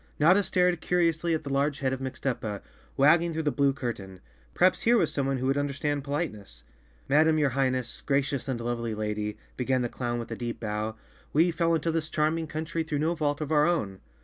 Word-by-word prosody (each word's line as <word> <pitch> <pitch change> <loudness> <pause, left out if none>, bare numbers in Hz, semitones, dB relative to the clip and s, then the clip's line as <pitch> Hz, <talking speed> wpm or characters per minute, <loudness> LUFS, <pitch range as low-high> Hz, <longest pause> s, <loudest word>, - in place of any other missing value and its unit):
Notta 180 +7 +6
stared 180 -3 +1
curiously 170 -1 +1
at 155 - -4
the 140 -2 -4
large 140 +1 +1
head 135 -2 -1
of 130 - -3
Mixtuppa, 125 -5 -3 0.3
wagging 165 +4 +4
through 160 0 -2
the 145 - +1
blue 140 +1 +3
curtain. 100 -8 -5 0.4
Perhaps 185 +1 +3
here 235 +1 +4
was 170 - +1
someone 135 -1 0
who 130 - -3
would 135 +2 +2
understand 145 0 -1
politeness. 110 - -4 0.4
"Madam, 155 +3 +4
your 145 -3 +2
Highness, 130 -2 -1
gracious 140 -2 0
and 130 -3 -2
lovely 115 -1 -2
lady," 105 0 -3 0.2
began 130 0 +1
the 120 - -1
clown 120 -1 -3
with 115 0 -6
a - - -2
deep 120 0 -5
bow, 110 0 -3 0.4
"we 165 +4 +4
fell 165 0 +1
into 165 +1 0
this 160 -1 -2
charming 160 +1 0
country 160 +2 -3
through 160 -2 -2
no 160 +4 +1
fault 145 -2 -1
of 155 0 -3
our 150 0 +4
own." 100 - -1
140 Hz, 200 wpm, -28 LUFS, 120-160 Hz, 0.4 s, Notta